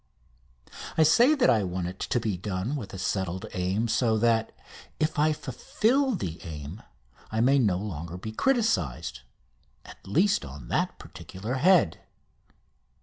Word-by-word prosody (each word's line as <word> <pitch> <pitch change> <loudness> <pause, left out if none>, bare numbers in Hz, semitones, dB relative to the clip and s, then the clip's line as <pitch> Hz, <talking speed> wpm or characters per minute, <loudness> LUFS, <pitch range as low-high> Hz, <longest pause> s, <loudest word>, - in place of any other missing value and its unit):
I 160 - +6
say 240 - +5
that 275 - +4
I 110 - +3
want 90 -1 -3
it 90 +2 -6
to 120 - 0
be 110 -4 -1
done 95 +7 -3
with 110 -9 -6
a - - -7
settled 95 -1 -2
aim, 95 +5 0
so 115 -1 +2
that, 115 0 +2 0.5
if 155 -1 0
I 155 +1 +4
fulfil 225 - 0
the 85 - -5
aim, 80 +4 -7 0.5
I 110 - -1
may 135 +4 +4
no 100 -8 +2
longer 85 -3 -5
be 110 +4 -6
criticised, 85 - 0 0.7
at - - -12
least 180 - +2
on 70 -2 -10
that - - 0
particular 105 +6 -7
head. 175 - +4
110 Hz, 145 wpm, -27 LUFS, 90-150 Hz, 0.7 s, I